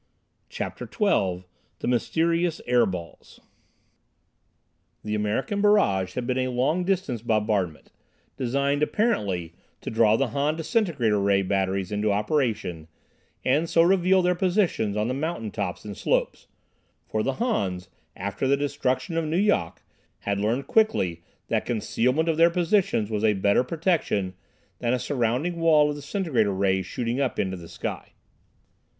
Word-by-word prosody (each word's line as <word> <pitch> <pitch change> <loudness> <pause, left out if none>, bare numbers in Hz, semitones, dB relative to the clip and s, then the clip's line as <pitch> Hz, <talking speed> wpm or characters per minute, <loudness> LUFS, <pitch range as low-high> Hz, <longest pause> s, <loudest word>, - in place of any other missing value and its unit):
CHAPTER - - -5
XII 95 - +1 0.3
The - - -5
Mysterious 165 +8 +1
"Air 120 -2 +3
Balls" 90 -3 -8 1.6
The 105 - -3
American 105 - -1
barrage 100 - +3
had 125 - -2
been 130 +1 0
a 130 - 0
long 130 +8 0
distance 175 - -1
bombardment, 105 -7 -1 0.4
designed, 140 +3 0
apparently, 100 - 0 0.3
to - - -5
draw 110 -1 +4
the 135 +2 0
Han 140 +6 0
disintegrator 160 - +1
ray 100 0 +2
batteries 95 0 -1
into 105 0 0
operation 105 - -1 0.6
and 150 +6 +2
so 165 - +4
reveal 185 +1 +4
their 180 0 +3
positions 175 - 0
on 105 +1 0
the 125 - -1
mountain 140 -6 -3
tops - - -4
and - - -6
slopes, - - -1 0.6
for 110 - -1
the 135 +5 0
Hans, 95 - -1 0.3
after 100 +7 -3
the 140 +1 +3
destruction 145 +3 -1
of 165 - 0
Nu 155 +2 -1
Yok, 185 - +1 0.4
had 100 0 -1
learned 115 +6 0
quickly 95 - +1 0.3
that - - +1
concealment 125 +6 0
of 160 -2 +1
their 165 +1 +6
positions 180 - +1
was 105 0 -1
a 110 -1 +4
better 100 +4 +2
protection 150 - 0 0.5
than 120 +1 +1
a - - 0
surrounding 130 +6 -1
wall 155 -3 +4
of - - -4
disintegrator 145 - 0
rays 95 -1 +1
shooting 120 +2 -2
up 135 - -1
into 95 -1 -1
the 85 -2 -10
sky. - - -6
125 Hz, 145 wpm, -25 LUFS, 105-165 Hz, 1.6 s, their